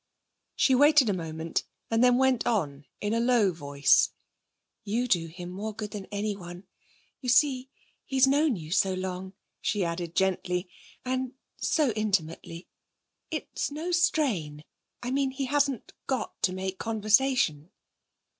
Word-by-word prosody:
She 265 - +3
waited 290 -2 +6
a - - +2
moment 165 -2 -3 0.3
and 225 +2 +3
then 250 0 +5
went 260 -2 +2
on 150 - -1
in 210 +1 -1
a 230 - +2
low 235 -5 +3
voice: 145 -3 +3 0.7
'You 230 +4 -1
do 170 -7 +2
him 175 +2 -8
more 210 +3 -5
good 210 -1 -5
than 200 -2 -6
anyone. 200 -4 -4 0.6
You 250 - -4
see, 260 +1 +3 0.3
he's 265 0 +3
known 285 0 +3
you 160 -4 -8
so 190 +1 +2
long,' 185 0 -5 0.3
she 200 -4 0
added 170 0 -4
gently, 180 -1 0 0.4
'and 255 0 -2 0.2
so 300 -6 +2
intimately. 185 -5 -2 0.6
It's - - -3
no 310 +5 -4
strain 230 - +1 0.4
I 245 - -2
mean 275 0 +1
he 270 +1 -3
hasn't 280 -2 0
got 260 -2 -3
to 185 - +2
make 190 0 -4
conversation.' 215 - +2
210 Hz, 140 wpm, -28 LUFS, 180-260 Hz, 0.7 s, waited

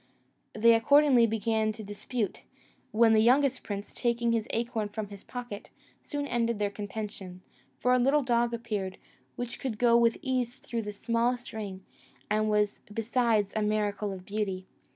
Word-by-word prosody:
They 230 +2 +5
accordingly 250 +1 +5
began 220 0 0
to 215 - -9
dispute; 205 +1 -4 0.5
when 225 0 +4
the 220 - +5
youngest 260 +3 +3
prince, 205 -1 -6
taking 235 -1 0
his 230 -1 0
acorn 230 -2 -1
from 210 -1 -5
his 200 -1 -11
pocket, 240 -5 -7 0.3
soon 290 -1 -4
ended 235 -3 0
their 205 -1 -1
contention; 200 -3 -7 0.3
for 250 - +2
a 255 - +4
little 275 +4 +3
dog 240 -1 +2
appeared, 215 -5 -3 0.4
which 245 -1 -5
could 230 -5 -4
with 235 -1 +4
ease 255 -2 -1
go - - -26
through 235 -1 -3
the 210 -1 -5
smallest 235 +3 -1
ring, 195 -4 -6 0.5
and 215 0 +2
was 210 -1 +1
besides 225 -2 +1
a 215 - +1
miracle 210 -1 0
of 185 -1 -8
beauty. 195 -2 -3
225 Hz, 160 wpm, -29 LUFS, 210-240 Hz, 0.5 s, They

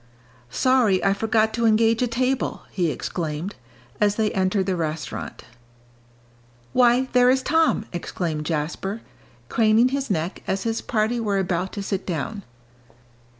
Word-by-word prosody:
"Sorry 225 - +2
I 195 - +4
forgot 220 +1 +1
to 235 -1 +1
engage 225 +1 +3
a 250 - +2
table!" 255 +3 -1
he 175 -4 0
exclaimed, 160 +5 -4 0.5
as 205 -1 +3
they 215 -1 +1
entered 190 0 +1
the 190 -1 0
restaurant. 160 -2 -4 1.3
"Why, 250 +1 +4
there 250 0 +5
is 260 0 +2
Tom!" 320 -8 +2
exclaimed 165 -3 -3
Jasper, 175 +7 -3 0.5
craning 225 - +4
his 275 0 -2
neck 170 -1 -2
as 190 0 -1
his 225 -1 -1
party 225 +1 0
were 205 -3 0
about 185 -1 -1
to 200 - -4
sit 195 0 -3
down. 185 +5 -3
210 Hz, 140 wpm, -23 LUFS, 185-235 Hz, 1.3 s, there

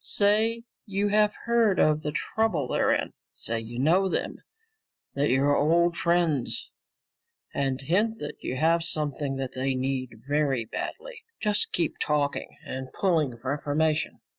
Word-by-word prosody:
Say 220 +3 +2 0.2
you 200 +1 0
have 210 0 +3
heard 235 -4 +3
of 155 0 +3
the 150 - -2
trouble 170 - 0
they're - - +2
in. - - 0 0.2
Say 115 0 -3
you 115 +1 -8
know 175 +9 +3
them, - - -2 0.8
that 140 +1 +1
you're 140 +3 +3
old 170 +4 +3
friends, 170 -7 0 0.8
and 135 -2 0
hint 205 +11 +1
that 150 - -7
you 130 - -2
have 165 +4 +3
something 150 -3 -2
that 135 -1 -3
they 130 +1 -1
need 130 -3 -3
very 140 -5 +1
badly. - - -6 0.2
Just 210 -1 0
keep 170 -3 -1
talking 145 -1 -1
and 130 0 -6
pulling 155 -10 +1
for 130 +3 -2
information. 150 +1 0
150 Hz, 145 wpm, -27 LUFS, 135-190 Hz, 0.8 s, have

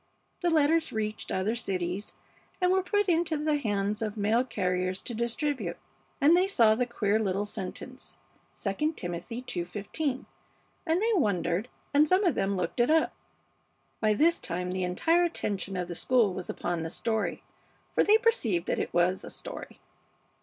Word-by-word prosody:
The 350 - +2
letters 320 0 +3
reached 215 -1 -3
other 190 +4 0
cities 190 -3 -3 0.4
and 360 -1 +3
were 380 0 +3
put 410 +2 +1
into 335 -2 +2
the 300 0 +1
hands 205 -4 -1
of 215 -1 -3
mail 215 +4 +2
carriers 185 -5 -1
to 240 - -5
distribute, 235 - -1 0.4
and 300 +4 +6
they 365 +2 +3
saw 230 - +5
the 245 +2 0
queer 215 -3 +1
little 200 -1 0
sentence, 195 -3 -7 0.5
'II 300 +11 0
Timothy 175 - -5
ii:15,' 210 - -3 0.6
and 330 +4 +2
they 460 0 +3
wondered, 200 - +1 0.3
and 295 +2 +5
some 370 +5 +3
of 350 -6 +3
them 195 -3 0
looked 180 +6 -2
it 240 - +4
up." 320 0 +3 0.9
By 215 -1 +2
this 335 +8 +3
time 180 0 -3
the 185 0 -1
entire 325 - +2
attention 200 - -2
of 180 -1 -2
the 175 - -5
school 225 +1 +2
was 180 - -6
upon 175 -1 -2
the 160 - -3
story, 220 +5 -2 0.5
for - - +3
they 425 +1 +6
perceived 250 - +1
that - - -1
it - - -2
was 175 +2 +2
a - - -7
story. - - -9
220 Hz, 165 wpm, -29 LUFS, 190-310 Hz, 0.9 s, and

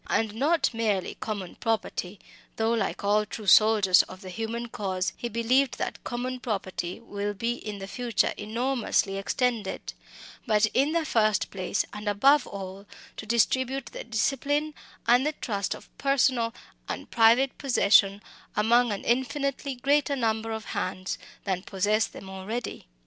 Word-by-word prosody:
And 220 -2 0
not 290 +6 +2
merely 215 -5 0
common 205 -5 -5
property 210 -4 -2 0.4
though 225 +1 +1
like 225 -1 -1
all 205 +1 +3
true 210 +1 -8
soldiers 210 -2 +6
of 185 +1 -11
the 185 -2 -8
human 225 +3 -4
cause 190 -4 -2
he 240 - -4
believed 240 +4 +2
that - - -4
common 255 +1 -3
property 195 -6 -3
will 205 -2 -4
be 230 +4 -1
in 210 -4 -6
the 195 - -6
future 235 +2 0
enormously 225 -2 0
extended 230 0 -1 0.5
but 215 -1 +4
in 280 +4 +2
the 335 -2 +1
first 215 -6 +2
place, 190 0 -1
and 210 0 -3
above 275 +9 +4
all, 195 0 -8 0.3
to 220 - -7
distribute 260 +3 +1
the - - -6
discipline 280 +6 0 0.3
and 245 +2 +5
the 305 +2 0
trust 200 -8 -2
of - - -16
personal 260 -4 +2 0.4
and - - -5
private 235 +4 +4
possession 205 -6 +4 0.3
among 235 +2 +4
an 200 - -3
infinitely 265 +3 -1
greater 280 +3 +2
number 225 -3 -1
of 220 -1 -4
hands 185 0 -3 0.2
than 190 -2 -1
possess 210 +3 +1
them 195 - -11
already. 190 - -5
225 Hz, 150 wpm, -27 LUFS, 205-250 Hz, 0.5 s, soldiers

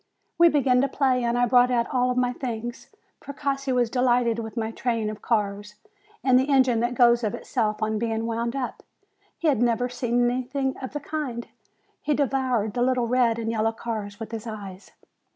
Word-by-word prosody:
We 340 0 +8
began 265 -4 +3
to 275 - +2
play, 260 -2 +1
and 235 0 0
I 245 - +3
brought 245 +1 +4
out 240 -2 +2
all 250 0 +2
my 250 0 +1
things. 240 -2 -5 0.3
Precossi 275 -1 -3
was 245 -2 +1
delighted 245 -2 +2
with 225 +1 -7
my 220 0 -1
train 225 -2 -1
of 215 - -10
cars, 210 -2 -1 0.5
and 255 -1 +5
the 265 +2 -1
engine 260 -4 +4
that 240 +2 -1
goes 240 -1 +4
of 210 - -1
itself 215 -3 -2
on 215 0 0
being 225 0 -1
wound 235 +2 -2
up. 265 -2 -4 0.6
He 335 - -1
had 270 -7 +2
never 245 +1 +1
seen 245 -1 0
anything 260 +2 -1
of 260 - -7
the 295 - -2
kind. 275 -6 -4 0.5
He 300 - 0
devoured 255 -6 0
the 245 - -2
little 250 -1 +2
red 240 -1 +2
and 225 -1 -2
yellow 225 0 0
cars 215 -3 -5
with 225 - -7
his 225 0 -6
eyes. 200 -3 -8
240 Hz, 190 wpm, -25 LUFS, 225-255 Hz, 0.6 s, We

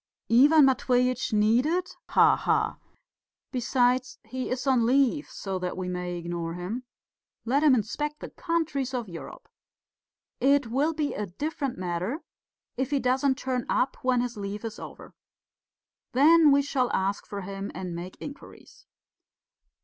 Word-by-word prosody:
"Ivan 285 +5 +7
Matveitch 255 -1 +1
needed? 245 +12 +2 0.2
Ha - - +5
ha! - - 0 0.7
Besides, 250 0 +1
he 255 0 -4
is 255 +1 -3
on 260 -4 +3
leave, 275 +2 +2
so 190 -2 -4
that 180 0 -4
we 185 -1 -3
may 180 0 -3
ignore 170 -1 -4
him 205 +8 -5 0.6
let 270 +5 +2
him 300 -4 +6
inspect 295 +7 -2
the - - -8
countries 310 -6 -2
of 240 -3 -3
Europe! 170 -3 -10 0.9
It 280 +1 +3
will 275 +8 0
be 300 -2 -1
a 210 - -3
different 280 - -4
matter 185 - -3 0.5
if 260 +1 -1
he 285 -1 +1
doesn't 260 +1 +1
turn 255 -3 -2
up 260 - +1
when 255 -1 +2
his 245 -2 -4
leave 205 +2 -5
is 225 0 -6
over. - - -10 1.0
Then 305 +4 +6
we 280 0 +4
shall 260 -3 0
ask 195 +1 -1
for 200 -1 -5
him 195 +1 -6
and 180 -1 -5
make 175 +2 -7
inquiries." - - -11
250 Hz, 145 wpm, -27 LUFS, 200-280 Hz, 1.0 s, Ivan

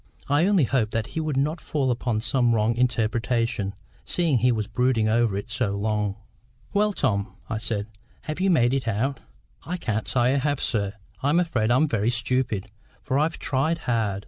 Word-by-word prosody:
I 145 +6 +3
only 200 -6 +4
hoped 120 -4 0
that 115 -1 0
he - - -2
would 155 -3 -1
not 150 +5 0
fall 135 -4 0
upon 120 -2 -1
some 120 -1 +2
wrong 110 +1 +2
interpretation, 115 -3 0 0.3
seeing 165 -8 +2
he 125 +2 +3
was 110 -3 -1
brooding 115 0 +1
over 110 -2 +2
it 100 +4 -6
so 115 -5 0
long. 105 -1 -1 0.6
"Well, 210 +1 +3
Tom," 105 - -1 0.2
I 110 - -1
said, 105 -3 -2 0.4
"have 155 +2 -4
you 195 - +3
made 125 -8 +3
it 135 -3 -1
out?" 115 +5 0 0.4
"I 180 +2 -3
can't 110 -9 -2
say 125 +1 +2
I - - +2
have, 145 0 0
sir. 100 -4 -1 0.3
I'm 145 +5 +3
afraid 125 -11 0
I'm 130 +6 +4
very 115 -4 +1
stupid, 120 -4 -1 0.3
for 135 0 0
I've 160 +3 0
tried 145 +5 0
hard. 110 -9 -1
120 Hz, 185 wpm, -25 LUFS, 110-140 Hz, 0.6 s, only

